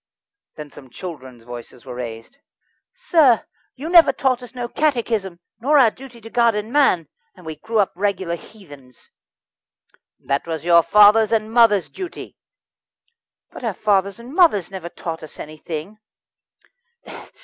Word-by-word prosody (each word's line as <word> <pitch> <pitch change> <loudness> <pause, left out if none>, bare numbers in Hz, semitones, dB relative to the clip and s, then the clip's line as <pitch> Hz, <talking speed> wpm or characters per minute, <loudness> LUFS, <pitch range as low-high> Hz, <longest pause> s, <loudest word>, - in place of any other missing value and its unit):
Then 150 -2 -10
some 130 -3 -14
children's 130 -7 -10
voices 120 +1 -11
were 125 - -8
raised: 120 - -8 0.5
"Sir, 330 - +3 0.3
you 280 +5 -7
never 340 -1 +6
taught 255 -2 0
us 245 +1 -12
no 245 -1 -4
Catechism, 230 - -1 0.2
nor 290 +6 +3
our 245 -5 +5
duty 255 -1 -13
to 225 - -11
God 235 -2 +3
and 210 +1 -4
to - - -12
man, 255 - +2 0.3
and - - -17
we 160 -1 -7
grew 225 +8 -4
up 205 -2 +2
regular 190 -2 -2
heathens." 145 - -16 1.1
"That 140 +4 -2
was 160 -2 -4
your 170 -1 +6
fathers' 210 +6 +5
and 220 -1 -1
mothers' 225 -5 +4
duty." 370 -3 -9 1.2
"But - - -11
our 220 -5 -2
fathers 200 +1 0
and 240 +4 -11
mothers 310 - +3
never 185 -3 -7
taught 165 -1 -6
us 155 - -12
anything." 155 +6 -8
205 Hz, 150 wpm, -20 LUFS, 160-240 Hz, 1.2 s, never